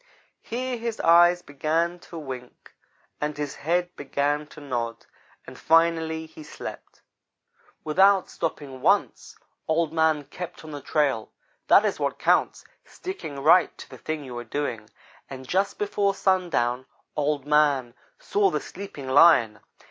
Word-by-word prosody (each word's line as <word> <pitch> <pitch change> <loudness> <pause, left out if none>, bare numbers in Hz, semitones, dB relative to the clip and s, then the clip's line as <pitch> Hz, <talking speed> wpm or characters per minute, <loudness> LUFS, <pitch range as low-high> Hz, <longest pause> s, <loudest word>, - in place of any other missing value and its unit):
Here 250 +2 -3
his 230 -1 -4
eyes 175 +1 +5
began 160 +5 -1
to 170 - -8
wink, 130 -5 -9 0.5
and 150 0 -2
his 145 -1 -4
head 175 +3 -1
began 145 +1 -1
to 150 - -13
nod, 120 -5 -4 0.4
and - - -11
finally 160 -1 +2
he 160 0 -13
slept. 150 - -10 0.8
"Without 190 +4 +4
stopping 140 -5 -5
once, - - +1 0.3
Old 160 0 +1
man 160 -2 +2
kept 180 +4 -8
on 155 - -9
the 145 -1 -7
trail. 140 -6 0 0.4
That - - +6
is - - -1
what - - -1
counts - - +1 0.2
sticking 355 - -7
right 170 +4 +5
to - - -10
the - - -11
thing 155 -2 -4
you 125 -3 -8
are - - -6
doing 115 -6 -4 0.4
and 130 -1 -9
just 195 +4 0
before 200 -1 0
sundown 155 -11 0 0.3
Old 145 -2 -1
man 145 -5 +2 0.2
saw 415 -5 +1
the - - -1
sleeping 180 -8 -9
Lion. 130 -7 +5
155 Hz, 140 wpm, -25 LUFS, 140-175 Hz, 0.8 s, That